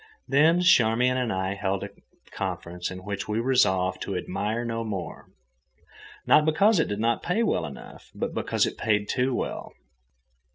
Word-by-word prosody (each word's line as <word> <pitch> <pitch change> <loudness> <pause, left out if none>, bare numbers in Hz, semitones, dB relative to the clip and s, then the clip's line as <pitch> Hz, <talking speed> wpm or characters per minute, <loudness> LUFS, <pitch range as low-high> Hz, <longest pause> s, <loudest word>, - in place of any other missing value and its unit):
Then 160 +5 +4
Charmian 125 -5 +4
and 125 -3 -1
I 95 0 -1
held 100 -1 -2
a - - -7 0.4
conference 90 +1 -4
in 95 0 -8
which 100 0 -4
we 105 +1 -1
resolved 95 -7 +2
to 100 - -4
admire 105 +6 -2
no 115 -1 -3
more—not 90 - -3
because 190 +6 +3
it - - +2
did 105 - -3
not 115 +1 +1
pay 200 +7 0
well 80 - 0
enough, 70 - -12
but - - -3
because - - 0
it - - -5
paid 105 -1 +1
too 125 0 0
well. - - -4
110 Hz, 160 wpm, -26 LUFS, 95-130 Hz, 0.4 s, Then